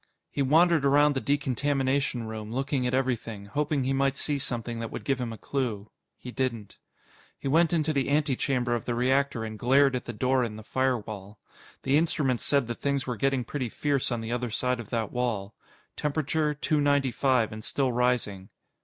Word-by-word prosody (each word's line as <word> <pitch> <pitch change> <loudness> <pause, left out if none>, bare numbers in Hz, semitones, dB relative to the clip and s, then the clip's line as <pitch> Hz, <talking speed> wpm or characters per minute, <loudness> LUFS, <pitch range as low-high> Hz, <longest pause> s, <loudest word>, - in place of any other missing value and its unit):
He 140 - -2
wandered 160 +3 +4
around 145 +1 +5
the 135 - -2
decontamination 140 -2 0
room, 110 -1 -6
looking 135 0 -1
at 125 - -2
everything, 115 -6 -2
hoping 145 +6 -1
he 135 +1 0
might 135 0 +1
see 145 -2 -1
something 120 -3 -3
that 115 -1 -4
would - - -6
give 135 -2 0
him 120 -2 -3
a 110 - -7
clue. 115 -7 -3 0.3
He 125 - -8
didn't. 120 -6 -3 0.6
He - - -5
went 165 +5 +4
into 160 -2 +1
the 140 -2 0
antechamber 135 -4 +1
of 120 - -2
the 120 - -1
reactor 130 0 +1
and 110 -1 -6
glared 135 +2 +4
at 125 - -3
the - - -4
door 130 +3 +2
in 110 -3 -3
the 110 - -9
firewall. 110 -5 -2 0.5
The 135 +2 +3
instruments 145 -6 +1
said 140 -3 +2
that 120 -2 -5
things 140 -1 0
were 125 - -2
getting 135 +2 +1
pretty 125 0 -3
fierce 140 +1 0
on 120 -1 -1
the 115 +1 -5
other 120 0 -1
side 125 +3 0
of 115 - -8
that 115 -3 -2
wall. 110 -5 -2 0.4
Temperature: 150 +1 0
Two 150 +1 +1
ninety 145 -2 +2
five 125 -2 +2
and 110 0 -7
still 135 +1 0
rising. 120 -6 0
130 Hz, 195 wpm, -27 LUFS, 115-140 Hz, 0.6 s, around